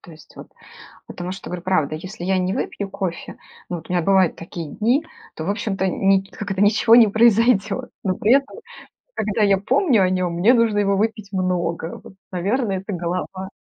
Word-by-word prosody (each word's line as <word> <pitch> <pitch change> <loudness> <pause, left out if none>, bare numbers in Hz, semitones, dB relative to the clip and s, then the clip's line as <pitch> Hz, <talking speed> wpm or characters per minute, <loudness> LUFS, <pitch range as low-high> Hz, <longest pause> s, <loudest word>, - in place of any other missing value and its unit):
то 175 - -15
есть, 155 -1 -16
вот. - - -11 0.6
Потому 180 +1 -6
что, 190 - -9
говорю, 180 -1 -5
правда: 160 -6 0
если 180 +3 -7
я 190 0 +1
не 185 +1 -1
выпью 200 -5 -4
кофе- 190 -4 -5 0.3
ну 175 - -3
вот, 165 - -11
у - - -4
меня 175 -1 +1
бывают 190 0 +3
такие 170 -1 -7
дни,- 245 +8 +1 0.3
то 160 - -6
в 185 - -1
общем-то, 200 -2 -2
ни 195 +1 +2
как 205 -1 -7
это, 195 0 -2
ничего 215 +2 +5
не 230 -3 +7
произойдёт. 225 +1 +2
Но 185 -2 0
при 215 - +2
этом, 275 0 0 0.6
когда 210 0 -1
я 200 -2 +4
помню 250 - +2
о 185 - +2
нём, 185 -2 -1
мне 200 +9 +4
нужно 230 -3 +2
его 200 -1 +2
выпить 215 -1 -2
много, 175 -3 -2
вот. - - -14 0.2
Наверно, 200 +5 -1
это 195 +2 -4
голова. 185 +2 -4
195 Hz, 200 wpm, -21 LUFS, 180-215 Hz, 0.6 s, не